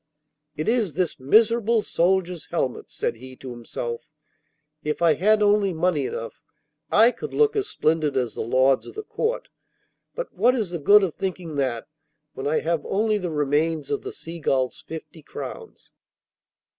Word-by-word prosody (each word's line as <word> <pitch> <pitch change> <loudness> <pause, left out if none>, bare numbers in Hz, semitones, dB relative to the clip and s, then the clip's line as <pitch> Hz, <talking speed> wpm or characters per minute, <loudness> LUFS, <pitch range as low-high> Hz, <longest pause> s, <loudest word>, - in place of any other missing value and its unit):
'It 155 - -3
is 220 - +1
this 180 -4 -1
miserable 220 - +3
soldier's 180 -1 0
helmet,' 135 -7 -2
said - - -3
he 130 +2 -9
to 130 0 -9
himself 120 0 -5 0.8
'If 150 0 -2
I 170 -2 +5
had 210 +7 +3
only 205 -2 +3
money 160 -5 +1
enough 115 - -6 0.5
I 225 +3 +6
could - - -7
look 440 -1 +3
as 410 -1 0
splendid 155 -3 +1
as 125 -3 0
the - - -4
lords 130 +3 +2
of - - -11
the 430 - -5
Court; 485 +3 -2 0.7
but - - -5
what 240 +7 +3
is 215 -8 -2
the 170 - -3
good 200 +7 +6
of 180 -5 0
thinking 180 -3 -4
of 145 - -5
that 125 -5 -1 0.5
when 135 - -4
I 155 - +1
have 165 -1 -1
only 215 +1 +1
the 180 -2 -3
remains 150 0 0
of 140 - 0
the - - -6
Seagull's 145 -6 -2
fifty 160 +1 -8
crowns? - - -9
165 Hz, 170 wpm, -24 LUFS, 140-210 Hz, 0.8 s, I